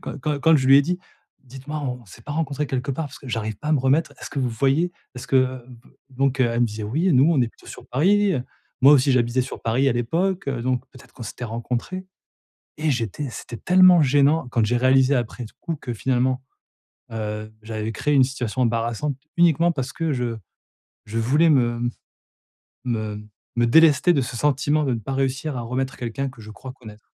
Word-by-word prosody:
quand 145 Hz, -, -6 dB
quand 150 Hz, +1 st, -1 dB
quand 160 Hz, +2 st, +5 dB
je 130 Hz, -, 0 dB
lui 135 Hz, -, +9 dB
ai -, -, +4 dB
dit: 180 Hz, +5 st, -2 dB, 0.5 s
«Dites-moi, 135 Hz, +4 st, -7 dB
on 125 Hz, -4 st, -5 dB
s'est 95 Hz, -, -15 dB
pas 145 Hz, -, -9 dB
rencontré 150 Hz, -2 st, -2 dB
quelque 130 Hz, +1 st, -2 dB
part 155 Hz, +3 st, -3 dB
parce 140 Hz, -, -12 dB
que 135 Hz, -, -14 dB
j'arrive 110 Hz, -2 st, -3 dB
pas 150 Hz, -, -6 dB
à -, -, +2 dB
me 145 Hz, -, +3 dB
remettre, 140 Hz, +5 st, +1 dB
est-ce -, -, -8 dB
que 145 Hz, -, -4 dB
vous 125 Hz, -, 0 dB
voyez?». 140 Hz, +9 st, +1 dB, 0.2 s
Est-ce 125 Hz, +2 st, -7 dB
que 130 Hz, -2 st, +1 dB, 0.5 s
donc, 135 Hz, +1 st, 0 dB
heu, -, -, +5 dB
elle 115 Hz, 0 st, -1 dB
me -, -, +3 dB
disait: 105 Hz, -1 st, -6 dB
«Oui, 160 Hz, -, +1 dB
nous 135 Hz, +3 st, +5 dB
on 145 Hz, -, +2 dB
est 120 Hz, -, -1 dB
plutôt -, -, -21 dB
sur -, -, -10 dB
Paris». 195 Hz, +8 st, +3 dB, 0.5 s
Moi 140 Hz, +3 st, +9 dB
aussi 140 Hz, 0 st, +3 dB
j'habitais 120 Hz, +1 st, +2 dB
sur 130 Hz, -, -8 dB
Paris 125 Hz, +4 st, +2 dB
à 130 Hz, -, +2 dB
l'époque, 170 Hz, +10 st, -1 dB
heu, 125 Hz, -4 st, -2 dB
donc 125 Hz, 0 st, 0 dB
peut-être 130 Hz, -, -16 dB
qu'on 120 Hz, -, -8 dB
s'était 115 Hz, -, -9 dB
rencontré 120 Hz, +11 st, -4 dB, 0.7 s
et 155 Hz, 0 st, 0 dB
j'étais 120 Hz, +4 st, -3 dB
c'était 120 Hz, -, -8 dB
tellement 180 Hz, -2 st, +6 dB
gênant 145 Hz, +2 st, +3 dB
quand 115 Hz, -2 st, +2 dB
j'ai 120 Hz, +3 st, +1 dB
réalisé 130 Hz, +2 st, +4 dB
après 120 Hz, 0 st, -3 dB
coup 165 Hz, -, -3 dB
que 125 Hz, -4 st, -6 dB
finalement, 130 Hz, +2 st, 0 dB, 0.7 s
heu, 110 Hz, 0 st, -5 dB
j'avais 110 Hz, 0 st, -4 dB
créé 150 Hz, +6 st, 0 dB
une 130 Hz, -2 st, +6 dB
situation 130 Hz, -1 st, -3 dB
embarrassante. 115 Hz, +4 st, -1 dB, 0.2 s
Uniquement 170 Hz, 0 st, +4 dB
parce 135 Hz, -4 st, -4 dB
que 165 Hz, -2 st, -2 dB
je 120 Hz, -3 st, -2 dB, 0.7 s
je 115 Hz, +2 st, -3 dB
voulais 150 Hz, +9 st, +3 dB
me 120 Hz, -4 st, +2 dB, 1.0 s
me 110 Hz, -3 st, -3 dB, 0.3 s
me 120 Hz, -, +3 dB
délester 160 Hz, +5 st, +5 dB
de 140 Hz, -, +2 dB
ce 120 Hz, -1 st, -5 dB
sentiment 145 Hz, +3 st, +1 dB
de 130 Hz, -, 0 dB
ne 115 Hz, -, -2 dB
pas 125 Hz, +6 st, -5 dB
réussir, 135 Hz, +2 st, -1 dB
à -, -, -3 dB
remettre 130 Hz, +4 st, -3 dB
quelqu'un 125 Hz, +3 st, -3 dB
que 115 Hz, -4 st, -14 dB
je 110 Hz, -, -11 dB
crois 125 Hz, +5 st, -9 dB
connaître. 110 Hz, -5 st, -13 dB
130 Hz, 210 wpm, -23 LUFS, 120-150 Hz, 1.0 s, lui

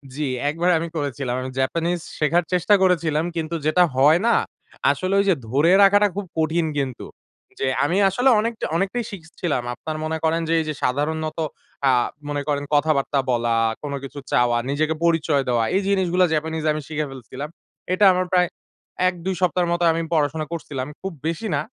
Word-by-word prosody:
জি, 150 Hz, -, -5 dB, 0.3 s
১বার 165 Hz, +4 st, 0 dB
আমি 165 Hz, +1 st, -2 dB
করেছিলাম। 140 Hz, -4 st, -2 dB
আমি 130 Hz, -, -5 dB
জাপানিজ 170 Hz, +5 st, 0 dB, 0.2 s
শেখার 165 Hz, +3 st, +2 dB
চেষ্টা 180 Hz, +3 st, +3 dB
করেছিলাম। 165 Hz, -4 st, +2 dB
কিন্তু 165 Hz, 0 st, -3 dB
যেটা 165 Hz, +4 st, +4 dB
হয় 145 Hz, +5 st, +5 dB
না! 235 Hz, -, +4 dB, 0.6 s
আসলে 185 Hz, +1 st, -2 dB
ঐ -, -, +6 dB
যে 180 Hz, -, +4 dB
ধরে 145 Hz, +9 st, +3 dB
রাখাটা 205 Hz, +1 st, +5 dB
খুব 205 Hz, 0 st, -3 dB
কঠিন 160 Hz, +1 st, +1 dB
কিন্তু। 130 Hz, -4 st, -3 dB, 0.5 s
যে -, -, 0 dB, 0.2 s
আমি 165 Hz, +6 st, +1 dB
আসলে 245 Hz, +7 st, +2 dB
অনেকটা 225 Hz, +1 st, -2 dB
অনেকটাই 195 Hz, +7 st, 0 dB
শিখছিলাম। 165 Hz, -6 st, -4 dB
আপনার 155 Hz, +5 st, -6 dB
মনে 160 Hz, 0 st, -2 dB
করেন 165 Hz, +1 st, +1 dB
যে 165 Hz, -, +1 dB
এই 160 Hz, -, -1 dB
যে, 155 Hz, -, -1 dB
সাধারণত 155 Hz, +4 st, -1 dB, 0.5 s
আ -, -, +5 dB, 0.4 s
মনে 145 Hz, 0 st, -1 dB
করেন 145 Hz, -1 st, 0 dB
কথাবার্তা 145 Hz, -1 st, +2 dB
বলা, 120 Hz, -1 st, +1 dB, 0.3 s
কোন 145 Hz, -1 st, -4 dB
কিছু 135 Hz, +1 st, -7 dB
চাওয়া, 120 Hz, -1 st, +3 dB
নিজেকে 155 Hz, +3 st, 0 dB
পরিচয় 160 Hz, -4 st, +2 dB
দেওয়া, 120 Hz, -2 st, +2 dB
এই 195 Hz, -, +3 dB
জিনিসগুলা 185 Hz, -2 st, +2 dB
জাপানিজ 160 Hz, +1 st, -2 dB
আমি 155 Hz, 0 st, -2 dB
শিখে 155 Hz, -1 st, -2 dB
ফেলছিলাম। 130 Hz, +3 st, -8 dB, 0.4 s
এটা 200 Hz, +2 st, +4 dB
আমার 185 Hz, 0 st, 0 dB
প্রায় 180 Hz, -1 st, +4 dB, 0.6 s
১,২ 185 Hz, +1 st, -2 dB
সপ্তাহের 180 Hz, -1 st, +1 dB
মত 175 Hz, 0 st, 0 dB
আমি 165 Hz, -, -1 dB
পড়াশোনা 155 Hz, 0 st, +1 dB
করছিলাম। 140 Hz, -5 st, -4 dB
খুব 195 Hz, -1 st, -5 dB
বেশি 170 Hz, +7 st, -3 dB
না। 140 Hz, -, 0 dB
160 Hz, 175 wpm, -22 LUFS, 145-180 Hz, 0.6 s, ঐ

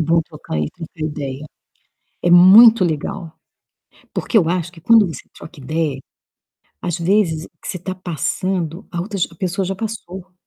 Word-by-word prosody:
bom 165 Hz, +1 st, +2 dB
trocar 150 Hz, -, -8 dB
a 75 Hz, -, 0 dB
trocar 165 Hz, -1 st, -11 dB
ideia. 145 Hz, -2 st, -4 dB, 0.8 s
É 175 Hz, -, +1 dB
muito 195 Hz, +5 st, +8 dB
legal, 160 Hz, 0 st, -3 dB, 0.8 s
porque 230 Hz, -, 0 dB
eu 175 Hz, -6 st, +3 dB
acho 175 Hz, -1 st, -2 dB
que 170 Hz, -2 st, -16 dB
quando 220 Hz, +3 st, +5 dB
você 165 Hz, -, -8 dB
troca 155 Hz, -, -13 dB
ideia, 150 Hz, 0 st, -2 dB, 0.8 s
às 175 Hz, 0 st, -3 dB
vezes, 170 Hz, -3 st, +1 dB
o -, -, -19 dB
que -, -, -9 dB
você 180 Hz, -, -4 dB
tá 185 Hz, +2 st, -5 dB
passando, 180 Hz, 0 st, -3 dB
a 170 Hz, -, -3 dB
outra 200 Hz, +3 st, -5 dB
já 175 Hz, -, 0 dB
a -, -, -16 dB
pessoa 185 Hz, +2 st, -2 dB
já 190 Hz, +1 st, -3 dB
passou. 190 Hz, -3 st, -7 dB
175 Hz, 170 wpm, -19 LUFS, 160-190 Hz, 0.8 s, muito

